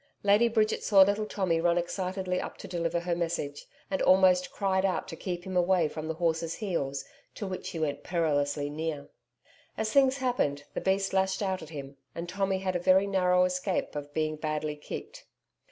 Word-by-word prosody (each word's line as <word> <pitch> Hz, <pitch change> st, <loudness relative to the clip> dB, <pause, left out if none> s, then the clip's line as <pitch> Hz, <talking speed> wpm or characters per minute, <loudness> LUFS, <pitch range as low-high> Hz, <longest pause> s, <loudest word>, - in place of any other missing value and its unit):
Lady 205 Hz, +4 st, +5 dB
Bridget 220 Hz, -2 st, +1 dB
saw 195 Hz, -3 st, +7 dB
little 205 Hz, +2 st, 0 dB
Tommy 175 Hz, -6 st, 0 dB
run 170 Hz, 0 st, +3 dB
excitedly 185 Hz, +1 st, -2 dB
up -, -, -7 dB
to -, -, -9 dB
deliver 170 Hz, -1 st, -1 dB
her 175 Hz, 0 st, -1 dB
message, 165 Hz, -4 st, -3 dB, 0.2 s
and 190 Hz, -, 0 dB
almost 185 Hz, -1 st, +5 dB
cried 190 Hz, -2 st, 0 dB
out 190 Hz, -2 st, 0 dB
to -, -, -8 dB
him -, -, -20 dB
to -, -, -14 dB
keep 175 Hz, -2 st, -3 dB
away 180 Hz, -2 st, +2 dB
from 155 Hz, +1 st, -6 dB
the 160 Hz, -, -2 dB
horses' 165 Hz, -1 st, 0 dB
heels, 140 Hz, -10 st, -2 dB, 0.3 s
to 210 Hz, -, -5 dB
which 185 Hz, -1 st, -5 dB
he -, -, -6 dB
went 155 Hz, -3 st, -1 dB
perilously 145 Hz, -4 st, 0 dB
near. 150 Hz, -1 st, -4 dB, 0.7 s
As 220 Hz, 0 st, -1 dB
things 270 Hz, -1 st, +5 dB
happened, 240 Hz, -, 0 dB
the -, -, -3 dB
beast 195 Hz, 0 st, +1 dB
lashed 190 Hz, +1 st, +1 dB
out 190 Hz, -1 st, -1 dB
at 160 Hz, -, -9 dB
him, 140 Hz, -3 st, -8 dB, 0.2 s
and 170 Hz, +1 st, -5 dB
Tommy 195 Hz, +1 st, 0 dB
had 190 Hz, -1 st, -2 dB
a -, -, +1 dB
very 185 Hz, +2 st, +4 dB
narrow 180 Hz, -2 st, +3 dB
escape 185 Hz, -1 st, -1 dB
of 145 Hz, 0 st, -5 dB
being 155 Hz, 0 st, -1 dB
badly 155 Hz, -1 st, -2 dB
kicked. 445 Hz, -, -8 dB
180 Hz, 195 wpm, -29 LUFS, 160-195 Hz, 0.7 s, saw